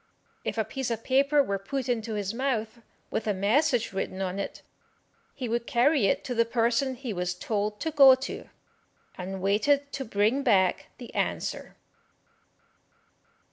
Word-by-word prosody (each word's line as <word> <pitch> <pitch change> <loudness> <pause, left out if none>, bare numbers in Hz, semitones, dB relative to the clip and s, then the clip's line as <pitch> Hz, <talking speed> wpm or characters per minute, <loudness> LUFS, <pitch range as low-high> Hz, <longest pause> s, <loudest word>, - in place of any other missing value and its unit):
If - - -3
a 220 - +1
piece 265 +3 -4
of 230 -1 -3
paper 280 +2 +3
were 200 -6 -2
put 260 +6 -4
into 225 -3 -1
his 205 0 -2
mouth, 235 -3 -2 0.3
with 220 - -2
a 210 - +1
message 235 +4 +2
written 190 0 -3
on 190 0 -2
it, 200 - -5 0.7
he 255 - -4
would 235 +1 -2
carry 265 -2 +3
it - - +1
to 250 - -3
the 230 -1 +3
person 235 +3 +1
he 245 -3 -5
was 180 -1 -2
told 210 +2 -2
to 320 - -1
go 275 -3 +8
to, 260 +1 -7 0.7
and 190 +1 -6
waited 280 +9 +2
to 270 - -3
bring 215 +4 +1
back 195 -8 +2
the 245 - -10
answer. - - -3
230 Hz, 160 wpm, -27 LUFS, 205-265 Hz, 0.7 s, go